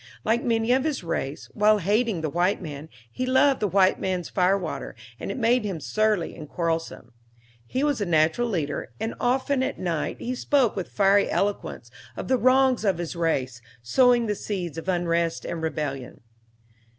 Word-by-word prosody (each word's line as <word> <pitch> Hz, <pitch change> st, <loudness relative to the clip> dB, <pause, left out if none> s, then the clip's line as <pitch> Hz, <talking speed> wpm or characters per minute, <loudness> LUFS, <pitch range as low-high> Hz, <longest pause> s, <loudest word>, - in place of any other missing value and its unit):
Like 230 Hz, +2 st, +1 dB
many 230 Hz, 0 st, +1 dB
of 260 Hz, +1 st, +3 dB
his 300 Hz, -, -2 dB
race, 150 Hz, -4 st, -3 dB
while 210 Hz, 0 st, +4 dB
hating 205 Hz, 0 st, 0 dB
the 155 Hz, -, -1 dB
white 180 Hz, +4 st, +1 dB
man, 155 Hz, -3 st, -8 dB, 0.2 s
he 255 Hz, -, -4 dB
loved 260 Hz, +1 st, +4 dB
the 210 Hz, -, +1 dB
white 190 Hz, -1 st, +3 dB
man's 185 Hz, -3 st, -2 dB
fire 185 Hz, +1 st, +2 dB
water, 190 Hz, -, -5 dB, 0.2 s
and -, -, -5 dB
it -, -, -4 dB
made 245 Hz, 0 st, +2 dB
him 195 Hz, -6 st, -3 dB
surly 215 Hz, 0 st, 0 dB
and 155 Hz, -3 st, -10 dB
quarrelsome. 165 Hz, -8 st, -3 dB, 0.5 s
He 260 Hz, -, -1 dB
was 290 Hz, -6 st, +1 dB
a -, -, +1 dB
natural 165 Hz, +9 st, +2 dB
leader, 150 Hz, -, -3 dB
and 225 Hz, -, -2 dB
often, 260 Hz, +2 st, +1 dB
at 260 Hz, -, -2 dB
night, 170 Hz, -4 st, -2 dB
he 250 Hz, -, -4 dB
spoke 255 Hz, -2 st, +1 dB
with 190 Hz, -3 st, -4 dB
fiery 200 Hz, 0 st, +3 dB
eloquence 205 Hz, 0 st, -2 dB, 0.3 s
of -, -, -5 dB
the 260 Hz, -, +4 dB
wrongs 255 Hz, -1 st, +4 dB
of 195 Hz, -5 st, +2 dB
his 175 Hz, 0 st, -4 dB
race, 130 Hz, -8 st, -1 dB, 0.2 s
sowing 245 Hz, -, +4 dB
the 210 Hz, -, 0 dB
seeds 180 Hz, -6 st, -4 dB
of 175 Hz, -, -6 dB
unrest 170 Hz, -2 st, 0 dB
and 165 Hz, -, -4 dB
rebellion. 145 Hz, -5 st, -4 dB
195 Hz, 180 wpm, -25 LUFS, 165-240 Hz, 0.5 s, while